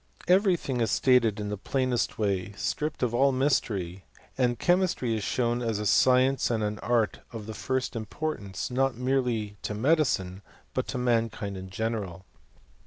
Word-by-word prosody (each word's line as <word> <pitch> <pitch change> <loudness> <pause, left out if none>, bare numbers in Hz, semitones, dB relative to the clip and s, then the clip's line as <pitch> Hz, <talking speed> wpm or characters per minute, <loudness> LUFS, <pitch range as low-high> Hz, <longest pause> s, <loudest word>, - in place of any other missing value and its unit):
Every 185 +1 +5
thing 130 -6 -3
is 115 - +1
stated 120 -5 +3
in 105 -1 -3
the 105 - -3
plainest 130 0 -1
way, 100 -2 -1
stripped 150 -2 -2
of 120 -2 0
all 135 +3 +4
mystery, 100 -9 0 0.3
and 125 -2 +1
chemistry 175 -8 +1
is 110 - -3
shown 120 +1 0
as 115 -3 -1
a 105 - -3
science 130 +4 +4
and 115 -2 0
an 105 0 -2
art 120 -3 +1
pf 115 -3 -7
the 110 - -6
first 130 +5 -2
importance, 110 -3 -4
not 135 0 +1
merely 125 -5 -1
to 105 - -4
medicine, 110 - +1 0.3
but 130 - -1
to 130 - -3
mankind 115 -4 0
in 95 0 -7
general. 100 -4 -3
120 Hz, 165 wpm, -27 LUFS, 105-130 Hz, 0.3 s, Every